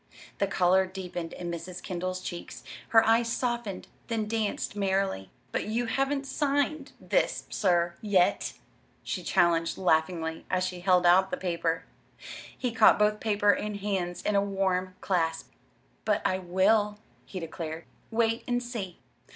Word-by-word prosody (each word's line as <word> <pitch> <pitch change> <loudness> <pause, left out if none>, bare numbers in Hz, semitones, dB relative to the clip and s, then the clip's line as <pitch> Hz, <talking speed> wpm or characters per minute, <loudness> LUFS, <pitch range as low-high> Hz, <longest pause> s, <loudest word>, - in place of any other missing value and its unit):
The 200 - +2
color 190 0 +3
deepened 180 -3 -6
in 175 -1 -5
Mrs. 175 +2 -6
Kendall's 185 0 -3
cheeks. 175 -2 -7 0.3
Her 225 0 +6
eyes 230 +1 +3
softened, 240 -6 -2 0.2
then 225 -3 -1
danced 215 -2 -2
merrily. 195 - 0 0.2
"But - - -1
you 230 +3 -1
haven't 275 +4 0
signed 285 +1 -1
this, - - 0
sir, 175 -3 +2
yet!" 195 -4 +2 0.5
she - - -3
challenged 165 -1 +2
laughingly, 160 -2 +1
as 185 0 +1
she 180 -1 -3
held 180 -1 +3
out 185 +2 +6
the - - -2
paper. 170 -2 -1 0.7
He 250 - -1
caught 230 - +6
both 210 0 +2
paper 205 -2 +3
and 210 +2 -2
hands 190 -3 -2
in 210 - +1
a 200 - +5
warm 190 -2 -1
clasp. 165 -3 -1 0.5
"But - - +1
I 185 - +1
will," 205 +4 +2 0.3
he 190 - -7
declared. 165 -1 -6 0.2
"Wait 225 0 +1
and 245 0 0
see!" 220 -8 -5
190 Hz, 145 wpm, -28 LUFS, 175-220 Hz, 0.7 s, Her